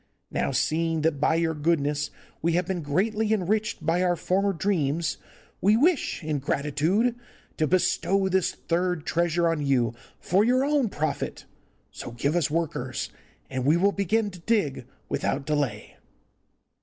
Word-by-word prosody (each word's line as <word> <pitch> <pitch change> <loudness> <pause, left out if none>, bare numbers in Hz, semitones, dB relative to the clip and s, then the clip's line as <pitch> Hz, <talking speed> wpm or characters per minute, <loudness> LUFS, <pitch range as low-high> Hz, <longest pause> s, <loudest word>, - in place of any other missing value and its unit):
Now, - - 0
seeing 160 +4 0
that 155 -2 +1
by 155 +2 +3
your 165 -1 +1
goodness 145 -2 0 0.3
we 170 +1 +1
have 175 +1 +1
been 180 -1 -2
greatly 210 +9 0
enriched 210 -3 0
by 165 +3 +2
our 180 -1 +2
former 195 +3 +1
dreams, 165 -4 0 0.4
we 205 +4 +5
wish, 300 - +1
in 155 -2 -1
gratitude, 150 - +1 0.4
to 155 - +2
bestow 190 +2 +2
this 190 -1 +2
third 175 -1 -1
treasure 170 0 +1
on 165 -3 0
you 125 -5 +2 0.3
for 190 +4 +2
your 255 +4 +3
own 285 -5 +2
profit; 155 -4 -3 0.5
so - - -7
give 140 +6 -1
us 170 -5 +2
workers, 165 +1 -2 0.4
and 130 -1 -3
we 150 +5 +4
will 200 +3 +3
begin 205 +2 0
to 180 - -11
dig 165 - 0 0.2
without 140 0 -1
delay. 145 -4 -2
170 Hz, 150 wpm, -26 LUFS, 150-195 Hz, 0.5 s, we